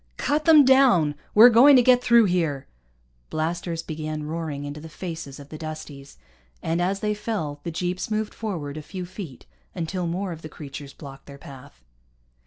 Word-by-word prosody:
"Cut 300 +2 0
them 310 -4 +7
down! 255 - +5 0.2
We're 235 +4 +9
going 265 +5 +7
to 250 - +6
get 250 0 +4
through 235 -2 +5
here!" 165 -7 -1 0.6
Blasters 165 +1 -3
began 155 -1 -5
roaring 155 -2 -4
into 145 +1 -7
the 160 - -10
faces 160 -4 -7
of 140 0 -12
the 155 - -9
Dusties, 155 -3 -8 0.5
and 165 +2 -1
as 195 +2 -1
they 210 0 0
fell 205 -9 -4
the 170 - -5
jeeps 180 +4 -3
moved 215 0 -2
forward 160 -10 -5
a - - -5
few 180 +4 -7
feet 175 - -9 0.3
until 175 +1 -3
more 185 +3 -3
of 165 -1 -8
the 155 - -9
creatures 140 -2 -9
blocked 140 -2 -12
their 140 -1 -11
path. 130 - -14
165 Hz, 180 wpm, -24 LUFS, 150-210 Hz, 0.6 s, We're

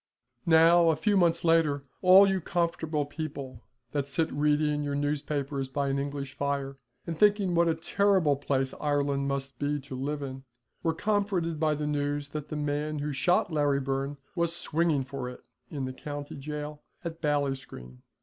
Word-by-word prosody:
Now 165 +1 +6
a 160 - +3
few 205 +7 +1
months 170 -3 +3
later 165 -4 +3 0.2
all 190 +2 +8
you 190 -1 +1
comfortable 160 -3 -1
people 140 -5 -6 0.3
that 140 -1 -2
sit 160 +3 0
reading 150 +1 +2
your 145 -1 -2
newspapers 145 -1 -2
by 140 +1 -1
an 135 0 0
English 140 -1 -4
fire, 140 -1 -2 0.3
and 165 -2 -5
thinking 205 -3 +4
what 170 0 +4
a 165 - +2
terrible 185 -2 +2
place 135 -1 -1
Ireland 140 -2 0
must 135 -2 -3
be 145 0 0
to 135 -1 -8
live 145 +3 -3
in, 135 -1 -6 0.4
were 165 -1 0
comforted 190 -4 0
by 155 -1 +2
the 150 0 -3
news 145 -1 -1
that 150 0 -6
the - - -4
man 150 +1 -2
who 150 +1 -2
shot 175 +4 +2
Larry 145 -2 +2
Byrne 135 +1 -2 0.2
was 170 -1 0
swinging 160 -4 +1
for 135 -1 -5
it 125 - -11 0.3
in 140 -3 -3
the 130 - -5
county 145 +1 -6
jail 150 +1 -6 0.2
at 165 0 -5
Ballinscreen. 135 - -2
145 Hz, 170 wpm, -28 LUFS, 140-165 Hz, 0.4 s, all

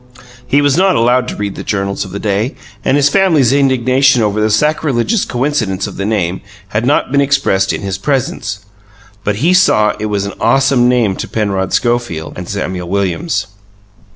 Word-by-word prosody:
He 145 +3 +2
was 145 +1 +2
not 190 0 +3
allowed 125 +2 +2
to - - -5
read 100 -1 -3
the - - -7
journals 100 -1 -2
of 95 - -9
the 100 - -6
day 105 +5 -1 0.3
and 135 - +2
his 145 -1 +4
family's 150 -7 +3
indignation 130 -2 +3
over 105 0 0
the 110 - +2
sacrilegious 150 - +1
coincidence 120 -8 -1
of - - -8
the 100 - -2
name 95 -5 -1 0.3
had 110 +4 -1
not 145 - +1
been 140 0 +3
expressed 135 -9 +1
in - - -4
his 95 -2 -4
presence. 105 -6 -2 0.6
But 105 0 0
he 180 - +4
saw 105 -13 +4
that - - -10
it - - -1
was 100 -2 -1
an 100 - -5
awesome 125 +1 +3
name 115 -6 +1
to - - -4
Penrod 100 -4 -2
Schofield 120 -10 -1
and 90 -1 -7
Samuel 90 -3 -4
Williams. 100 - -1
115 Hz, 185 wpm, -14 LUFS, 100-135 Hz, 0.6 s, his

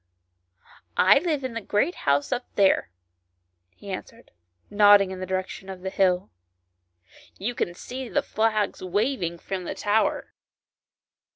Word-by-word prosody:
" 85 -2 -27 0.2
I 275 - +5
live 305 -4 -1
at 255 - -4
the 230 - -4
great 210 - 0 0.2
house 140 0 +2
up 245 0 -1
there," 195 - +3 0.9
he 200 - -9
answered, 230 +5 -8 0.4
nodding 205 -2 +6
in 190 - -6
the 185 - -5
direction 190 +1 -4
of 190 -1 -8
the 190 0 -4
hill. 185 -2 +1 0.5
" 85 0 -47 0.3
You 225 +6 -3
can 175 -6 -2
see 255 +5 -7
the - - 0
flag 215 -1 0
waving 185 -2 -1
from 185 +1 -5
the - - -4
tower." 210 +2 0
195 Hz, 150 wpm, -25 LUFS, 185-225 Hz, 0.9 s, nodding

